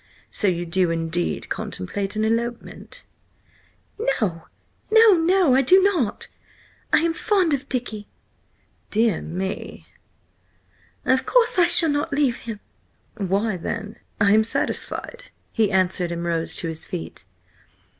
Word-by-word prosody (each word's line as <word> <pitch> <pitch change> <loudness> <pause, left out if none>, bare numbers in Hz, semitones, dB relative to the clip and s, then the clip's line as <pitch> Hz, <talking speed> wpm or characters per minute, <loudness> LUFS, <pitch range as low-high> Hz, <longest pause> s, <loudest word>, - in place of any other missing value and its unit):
So 205 - 0
you 175 -2 0
do 175 +1 +1
indeed 165 +1 -2
contemplate 195 - -4
an 215 0 0
elopement?" 235 +1 -4 1.0
"No, 210 - -1 0.4
no, 445 -1 +7
no! 350 -3 +3
I 265 - +5
do 365 +9 +6
not! 345 - 0 0.6
I - - +5
am 335 0 +1
fond 365 -3 +1
of 280 0 -3
Dicky!" 220 -5 -4 0.8
"Dear 220 -4 +1
me!" 190 +4 -5 1.2
"Of 260 0 +1
course 470 -6 +3
I 345 - +6
shall 335 -1 +6
not 290 0 -1
leave 280 -4 +1
him!" 225 -3 -7 0.6
"Why 200 +1 -1
then, 210 +5 -5 0.2
I 200 0 +4
am 220 +1 +5
satisfied," 480 - -3 0.3
he 220 -3 +1
answered, 185 -2 +1
and 170 0 -4
rose 165 -1 -1
to 170 - -2
his 160 -1 -6
feet. 165 - -7
220 Hz, 130 wpm, -22 LUFS, 180-300 Hz, 1.2 s, no